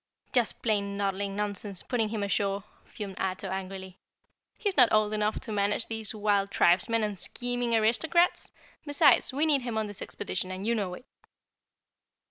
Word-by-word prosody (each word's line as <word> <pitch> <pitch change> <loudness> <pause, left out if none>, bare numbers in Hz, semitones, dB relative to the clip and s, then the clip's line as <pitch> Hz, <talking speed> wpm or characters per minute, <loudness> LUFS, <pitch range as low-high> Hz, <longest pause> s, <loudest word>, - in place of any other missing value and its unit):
"Just 245 -3 0
plain 200 -3 0
noddling 200 0 -2
nonsense, 205 -2 -3
putting 230 -4 0
him 215 -2 -3
ashore," 200 0 0 0.2
fumed 195 -3 -8
Ato 190 0 -2
angrily. 190 0 -6 0.6
"He's 405 -3 -1
not 250 -4 +6
old 215 0 +3
enough 210 0 0
to 235 - -6
manage 205 +2 +1
these 220 -1 -3
wild 205 -1 +1
tribesmen 200 +6 +3
and 205 -3 -2
scheming 245 -1 -1
aristocrats. 320 +11 +2 0.3
Besides, 290 -2 +4
we 285 +4 +1
need 290 -4 +4
him 240 -3 -3
on 220 - 0
this 205 -1 -7
expedition, 185 -2 -4
and 185 +2 -5
you 235 - +2
know 195 -5 -2
it." 250 - -14
210 Hz, 160 wpm, -28 LUFS, 195-230 Hz, 0.6 s, not